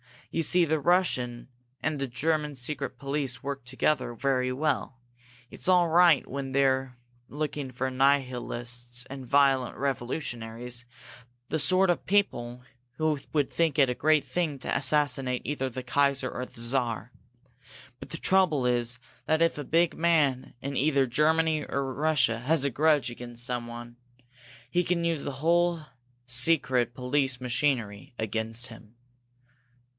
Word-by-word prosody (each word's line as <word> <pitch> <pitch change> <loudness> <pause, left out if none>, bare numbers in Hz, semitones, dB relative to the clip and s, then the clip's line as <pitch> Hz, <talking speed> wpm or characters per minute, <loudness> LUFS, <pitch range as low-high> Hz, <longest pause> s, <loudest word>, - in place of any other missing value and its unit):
You 165 - 0
see 180 +2 +4
the 160 0 0
Russian 135 -8 +1 0.3
and 155 -2 -1
the 135 - -2
German 150 +3 -1
secret 135 +1 -4
police 135 -2 -3
work 140 -2 -5
together 130 -1 0
very 130 0 0
well. 135 -1 -1 0.5
It's - - -6
all 180 -2 +4
right 170 -3 +5
when 135 -1 -5
they're 130 -2 +1 0.3
looking 145 -2 -4
for 130 +1 -3
nihilists 125 -2 -1
and 135 -1 -8
violent 135 -2 +3
revolutionaries 120 -3 -4 0.6
the 160 - -1
sort 185 +6 +4
of 175 - -3
people 125 -12 0 0.3
who 155 +2 0
would 145 -3 +1
think 165 -4 +1
it 135 -3 +5
a - - 0
great 155 +3 +3
thing 165 -5 -2
to - - -2
assassinate 135 -3 +1
either 135 -3 -2
the 130 +1 -6
Kaiser 140 0 +1
or 125 - -4
the 115 - -12
Czar. 120 -1 -1 0.9
But - - -10
the 165 - -5
trouble 170 -8 +2
is 120 0 +1 0.3
that 160 +1 +1
if 165 -2 +2
a 145 - -4
big 170 +3 +2
man 150 -6 +1
in 140 0 -4
either 140 -1 +3
Germany 155 +4 +2
or 135 -1 -2
Russia 145 -5 +2
has 140 +4 +2
a 140 - 0
grudge 150 -1 +2
against 120 0 -8
someone, 120 -1 -5 0.7
he 175 +7 +1
can 170 0 0
use 165 -4 -1
that - - -2
whole 170 +4 +1 0.4
secret 125 -2 +2
police 130 0 +1
machinery 120 -5 -1
against 110 +2 -2
him. 110 0 -14
135 Hz, 145 wpm, -28 LUFS, 125-155 Hz, 0.9 s, right